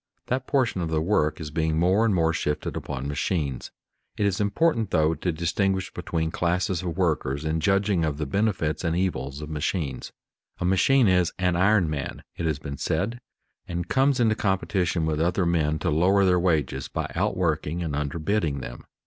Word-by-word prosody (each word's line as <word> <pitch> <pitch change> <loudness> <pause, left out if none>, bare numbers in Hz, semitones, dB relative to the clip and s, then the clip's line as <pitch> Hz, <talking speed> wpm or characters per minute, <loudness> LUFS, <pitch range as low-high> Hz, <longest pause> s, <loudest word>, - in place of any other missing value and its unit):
That 130 +1 -2
portion 130 -9 +1
of 85 - -2
the 80 -1 +1
work 80 -3 +1
is 75 -2 -6
being 80 0 0
more 95 +6 +3
and 105 -4 +2
more 80 -1 +2
shifted 75 -1 -2
upon 70 +1 -4
machines. 75 -3 -2 0.5
It 105 - +1
is 100 0 0
important, 115 - +1
though, 80 -3 +2
to 90 +2 -2
distinguish 95 +4 -1
between 80 -1 -2
classes 90 +1 0
of 85 -3 -4
workers 75 -5 0
in 80 +1 0
judging 95 +1 +2
of 75 -3 -1
the 75 - -2
benefits 90 -1 0
and 80 -1 0
evils 75 -7 -2
of 75 - -7
machines. 75 -2 -3 0.5
A - - -1
machine 115 +7 +4
is 90 -2 +3
"an 90 -1 +1
iron 95 0 +3
man," 75 -2 -4
it 85 - -2
has 80 -3 0
been 70 -1 -7
said, 115 +5 -1 0.5
and 85 0 -3
comes 135 0 +3
into 115 -3 +4
competition 90 -4 0
with 80 -1 0
other 90 +2 +1
men 80 -3 +1
to 80 +2 -1
lower 95 +6 +4
their 90 -1 +4
wages 75 -7 0
by - - -4
outworking 85 -2 -1
and 80 -3 -3
underbidding 75 +2 -1
them. - - -8
85 Hz, 185 wpm, -25 LUFS, 75-95 Hz, 0.5 s, machine